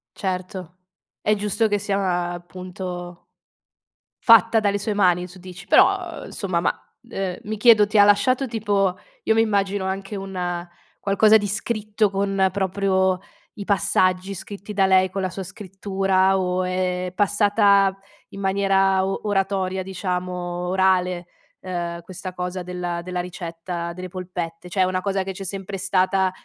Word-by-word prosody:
Certo. 185 -2 -4 0.5
È 210 - +2
giusto 210 +2 +1
che 205 -1 0
sia 190 -3 -1
appunto 175 0 -7 1.0
fatta 230 0 +6
dalle 205 -1 +1
sue 205 +1 -2
mani 180 -3 +2
tu 185 +1 -14
dici. 180 0 -11
Però, - - +7 0.3
uhm, - - -9
insomma 185 -4 -2
ma, 170 - -3 0.2
uhm, 190 -4 -3
mi 215 +1 -4
chiedo 215 -2 +6
ti 210 - 0
ha 205 - +8
lasciato 250 +6 +3
tipo 205 -5 0 0.3
io - - +3
mi 225 - +4
immagino 200 -3 0
anche 195 +2 -4
un 180 -3 -4 0.3
qualcosa 215 +2 +5
di 205 - -2
scritto 215 +1 -1
con 195 -1 +1
proprio 190 -1 +1 0.3
i 205 - -7
passaggi 185 -1 +1
scritti 200 +2 -8
da 195 -1 +3
lei, 190 0 +4
con 195 +2 -3
la 185 - -1
sua 190 +2 -6
scrittura 195 0 0
o 185 0 0
è 180 0 -1
passata 205 -1 +3 0.3
in 195 - -10
maniera 195 -1 +2
o 195 - -2
oratoria 195 -2 0
diciamo, 180 -1 -3 0.4
orale, 185 -1 +1 0.3
uhm, 175 -2 -4
questa 185 +1 -7
cosa 180 +1 -4
della 175 -1 -4
della 180 0 -3
ricetta 170 -1 -6
delle 185 +1 -7
polpette? 180 -2 -6
Cioè 190 +1 0
è - - +6
una 185 0 0
cosa 195 0 -1
che 190 - -4
c'è 195 +1 -7
sempre 195 +1 -5
stata, 190 0 +1
190 Hz, 150 wpm, -23 LUFS, 180-200 Hz, 1.0 s, ha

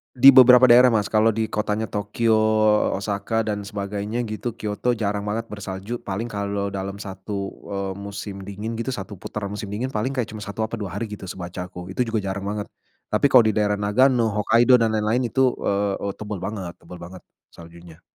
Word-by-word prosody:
Di 130 +2 +6
beberapa 130 -1 +9
daerah 125 +1 +7
Mas, 105 -3 +1
kalau 110 +1 +3
di 110 0 -1
kotanya 105 +1 -2
Tokyo, 105 +3 0 0.6
Osaka, 105 +3 -2
dan 105 -1 -2
sebagainya 105 +3 -4
gitu, 110 +3 -4
Kyoto 110 +2 -2
jarang 105 -3 -2
banget 110 +2 -3
bersalju, 100 +2 -6
paling 100 +4 -3
kalau 100 -2 -3
dalam 100 0 -5
1, 100 0 -6 0.3
eee, 100 -1 -3
musim 100 0 -7
dingin 105 +4 -5
gitu 115 +3 -3
1 105 -3 -6
putaran 100 +2 -6
musim 105 -1 -6
dingin, 110 +5 -2
paling 130 0 -2
kayak 125 -4 -2
cuman 110 -1 -8
1 110 +2 -3
apa 115 - -5
2 100 -5 -5
hari 115 - -3
gitu 105 -1 -9
sebacaku, 90 0 -7
itu 125 - +2
juga 115 -2 -1
jarang 95 0 -3
banget, 105 +1 -3 0.4
tapi 130 +6 +2
kalo 120 -4 +7
di 110 - +1
daerah 105 -1 +1
Nagano, 115 +1 +2
Hokkaido, 120 +4 +5
dan 115 -2 +2
lain-lain 110 +3 0
itu, 130 0 +2
eee 100 0 0
eee, 100 - -1
tebel 105 -2 -5
banget 95 -5 -5
tebel 90 - -11
banget, 90 +1 -10 0.2
saljunya. 85 -1 -14
105 Hz, 190 wpm, -23 LUFS, 100-115 Hz, 0.6 s, beberapa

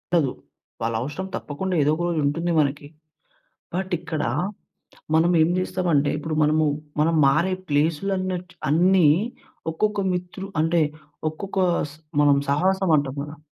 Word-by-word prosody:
ఉండదు. 145 -7 +3 0.5
వాళ్ళవసరం 120 +11 -2
తప్పకుండా 185 +6 -4
ఏదోక 155 +4 +2
రోజు 170 -2 0
ఉంటుంది 165 +5 0
మనకి. 145 0 0 0.9
బట్, 190 +1 -2
ఇక్కడ 160 -3 -3 0.9
మనం 165 +2 +4
ఏం 160 - +4
జేస్తాం 185 -1 -1
అంటే, 145 0 +3
ఇప్పుడు 155 +1 -3
మనము 155 +1 +3 0.3
మనం 165 +2 +3
మారే 155 +7 +3 0.2
ప్లేస్‌లు 155 +6 +1
అన్నటు 180 -1 -4
అన్ని 175 +3 +4 0.7
ఒక్కొక్క 210 +5 0
మిత్రు 180 +2 -4
అంటే, 165 +1 +2 0.5
ఒక్కొక్క 195 +5 -6 0.3
స్ - - -15 0.3
మనం 145 -1 +5
సహవాసం 190 +5 +2
అంటాం 140 -1 -1
కదా! 150 +2 -8
160 Hz, 130 wpm, -24 LUFS, 145-185 Hz, 0.9 s, మనం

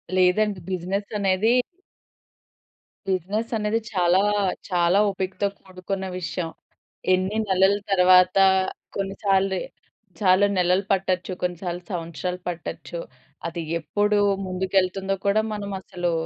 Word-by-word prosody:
లేదండి. 185 +2 +3
బిజినెస్ 190 +3 -2
అనేది... 200 +5 +3 1.5
బిజినెస్ 195 +5 -1
అనేది 210 +1 0
చాలా, 180 0 +3 0.5
చాలా 175 +1 +3
ఓపికతో 190 +1 -2
కూడుకున్న 190 +1 -5
విషయం. 175 -1 -3 0.6
ఎన్ని 185 +3 0
నెలల 190 +1 +4 0.2
తర్వాత 185 0 +5 0.6
కొన్ని 195 0 -3
సార్లు, 195 -1 +2 0.6
చాలా 190 0 +5
నెలలు 180 +2 +3
పట్టొచ్చు. 185 -1 0
కొన్నిసార్లు 175 0 -3
సంవత్సరాలు 180 +1 -4
పట్టొచ్చు. 170 0 -6 0.5
అది 170 0 -4 0.2
ఎప్పుడు 205 +5 +1 0.3
ముందుకెళ్తుందో 190 +1 0
కూడా 205 +2 +4
మనమసలు 190 -4 -3
185 Hz, 95 wpm, -24 LUFS, 180-195 Hz, 1.5 s, తర్వాత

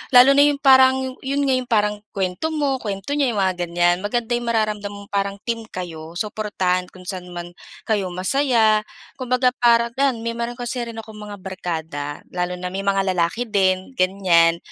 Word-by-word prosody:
lalo 250 +2 +9
na 280 +1 +5
'yong 290 -1 +1
parang 260 -1 +5
'yon 275 +2 -1
nga 270 -1 +2
'yong 250 - -7
parang 210 -2 +2 0.2
kuwento 190 +8 -1
mo, 290 -4 0
kuwento 200 +1 -5
niya 275 -6 +1
'yong 205 - 0
mga 185 -1 +1
ganyan. 175 +1 +2
Maganda 225 +4 -2
'yong 240 0 -1
mararamdam 215 -3 0
mong 200 0 -11
parang 200 0 -1
team 230 -2 -3
kayo, 165 -4 -7
suportahan 190 -3 -1
kung 185 - -14
saan 180 -1 -5
man 175 0 -6 0.3
kayo 210 -4 0
masaya. 220 +3 +2 0.4
Kumbaga 255 0 +2
parang 235 -1 +4
yan 260 -5 +1
meron 235 +1 -3
kasi 245 +1 -4
rin 235 -1 -6
akong 220 -1 -9
mga 210 -1 -7
barkada 165 -6 -5
lalo 180 0 -2
na 180 0 -5
may 195 +1 -3
mga 195 0 +2
lalaki 180 +6 0
din, 190 -2 +1
ganyan. 180 -3 +3
210 Hz, 180 wpm, -21 LUFS, 185-240 Hz, 0.4 s, lalo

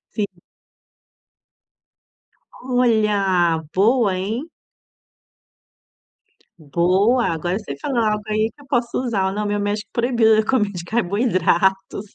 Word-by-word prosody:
Sim. 210 -2 -1 2.3
Olha, 210 -9 +1
boa 215 +1 +3
hein. 220 - -4 2.1
Boa, 185 - +1
agora 175 +3 -2
você 210 -10 -7
falou 270 -3 -2
algo 215 -2 0
aí 215 +1 0
que - - -18
eu 280 - -18
posso 245 -3 -1
usar. 210 -7 -1
Não, 210 +1 -3
meu 205 0 -1
médico 205 +1 -3
proibiu 235 -2 +3
a 220 - 0
comer 210 -4 +1
de 180 -3 -7
carboidratos. 195 -2 0
210 Hz, 110 wpm, -20 LUFS, 190-235 Hz, 2.3 s, boa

